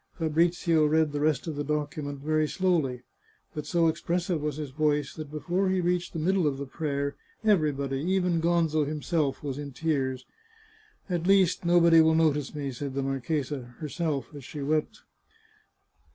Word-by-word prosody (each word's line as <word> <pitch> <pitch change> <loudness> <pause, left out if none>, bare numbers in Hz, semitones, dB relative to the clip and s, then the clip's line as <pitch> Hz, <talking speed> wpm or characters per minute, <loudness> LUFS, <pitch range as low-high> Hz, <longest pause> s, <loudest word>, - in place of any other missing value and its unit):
Fabrizio 165 0 +2
read 155 0 +2
the 145 - -2
rest 150 -2 +1
of 160 -3 -4
the 145 - -2
document 145 -1 -3
very 155 +1 +1
slowly, 155 -10 0 0.5
but 150 - -5
so 170 -2 +3
expressive 170 +1 -1
was 150 -1 -2
his 150 -3 -5
voice 150 0 0
that, 155 -2 -7
before 175 +6 -1
he 185 0 +1
reached 175 0 0
the - - -4
mid 165 +5 +1
dle 185 -5 +2
of 140 -2 -1
the 140 - -4
prayer, 140 0 -3 0.3
everybody, 150 -10 +1
even 180 +1 +1
Gonzo 165 -2 +2
himself, 150 -1 -1
was 140 -1 -4
in 140 -2 -6
tears. 130 -4 -1 0.4
" 435 - -32
At 175 0 -1
least 190 -3 +3
nobody 170 -1 +6
will 160 0 +4
notice 150 -3 +1
me," 140 -2 -3
said 135 +2 -5
the 140 - -1
marchesa 135 +2 -2
to 125 - -10
herself, 150 -5 -3
as 145 -2 -9
she 145 +3 -6
wept. 155 +2 -1
155 Hz, 175 wpm, -27 LUFS, 145-170 Hz, 0.5 s, nobody